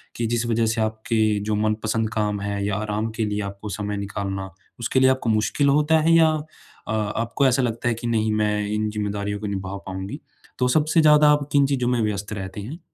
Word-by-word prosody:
कि 115 - -2
जिस 120 +1 0
वजह 115 -1 +1
से 110 0 0
आपके 110 -1 0
जो 105 0 -1
मनपसंद 110 +1 0
काम 105 -2 -1
हैं, 100 0 -3
या 100 0 -1
आराम 105 +1 -2
के 110 - 0
लिए 105 0 -2
आपको 100 +2 -8
समय 105 +1 -3
निकालना, 100 -1 -4 0.3
उसके 120 +3 +1
लिए 130 - +5
आपको 130 -3 0
मुश्किल 110 +6 +2
होता 150 +3 +4
है? 165 +2 +3
या 165 -1 +6 0.6
अ, - - -3
आपको 110 +5 -1
ऐसा 130 +1 +2
लगता 115 0 -2
है 120 - +2
कि 120 +2 -5
नहीं 110 -2 +1
मैं 105 -1 0
इन 105 +1 -1
ज़िम्मेदारियों 105 -1 -3
को 105 - -4
निभा 100 -1 -4
पाऊँगी? 95 0 -6 0.4
तो 125 - +3
सबसे 155 +4 +3
ज़्यादा 150 -1 +6
आप 145 -1 +1
किन 140 -1 +4
चीज़ों 130 -3 0
में 125 -2 +1
व्यस्त 105 -1 -2
रहते 95 0 -6
हैं? 140 +11 -7
110 Hz, 215 wpm, -23 LUFS, 105-120 Hz, 0.6 s, या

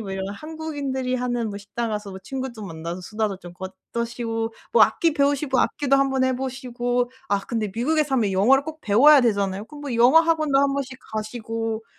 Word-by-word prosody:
뭐 195 -3 -5
이런 190 0 -3
한국인들이 285 -1 -4
하는 245 -3 -1
뭐 200 - -6
식당 225 +3 -4
가서 210 -1 -4
뭐 190 - -8
친구 265 +6 -5
좀 215 -3 -8
만나서 170 +2 -6
수다도 210 +1 -2
좀 175 -2 -11
꺼 190 +1 -7 0.2
떠시고 230 -1 -3 0.2
뭐 - - +7
악기 330 -2 +3
배우시고, 280 -2 +2
악기도 275 -2 +2
한번 270 -1 +2
해 260 0 +1
보시고. 245 -1 -2 0.2
아 200 0 +1
근데 215 0 -3
미국에 305 +7 +2
살면 250 -8 0
영어를 255 +9 +4
꼭 315 0 -7
배워야 270 +8 +6
되잖아요. 200 -4 0
그럼 295 +3 -11
뭐 280 -4 -3
영어 245 +7 +6
학원도 315 -4 +2
한번씩 275 -1 0 0.2
가시고." 225 0 -3
245 Hz, 395 characters per minute, -23 LUFS, 215-275 Hz, 0.2 s, 뭐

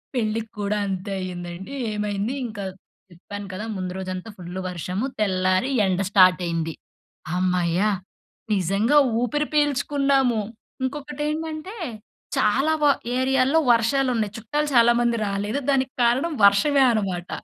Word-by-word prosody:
పెళ్ళికి 220 -2 -1
కూడా 205 +1 0
అంతే 190 +1 -4
అయిందండి. 180 +4 -6 0.2
ఏమైంది 210 +2 -2
ఇంకా 210 -3 -7 0.5
చెప్పాను 200 +4 -8
కదా! 205 +4 -5
ముందు 185 -1 -3
రోజంతా 185 +2 -5
ఫుల్లు 180 +1 -6
వర్షము. 180 - -3
తెల్లారి 185 +4 +1
ఎండ 190 0 0
స్టార్ట్ 185 -2 +6
అయింది. 165 -1 -2 0.6
హమ్మయ్య! 180 -1 +1 0.7
నిజంగా 195 - +2 0.2
ఊపిరి 295 +5 0
పీల్చుకున్నాము. 280 -4 +2 0.4
ఇంకొకటేంటంటే 300 - -4 0.6
చాలా 270 +9 +2
వ - - +5 0.3
ఏరియాలో 265 +3 +3
వర్షాలున్నాయి, 230 -2 +1
చుట్టాలు 295 +7 -2
చాలామంది 235 0 +4
రాలేదు, 205 +6 -2
దానికి 265 -1 +2
కారణం 260 +8 +2
వర్షమే 270 +8 +5
అనమాట. 190 -5 -2
215 Hz, 110 wpm, -23 LUFS, 185-270 Hz, 0.7 s, స్టార్ట్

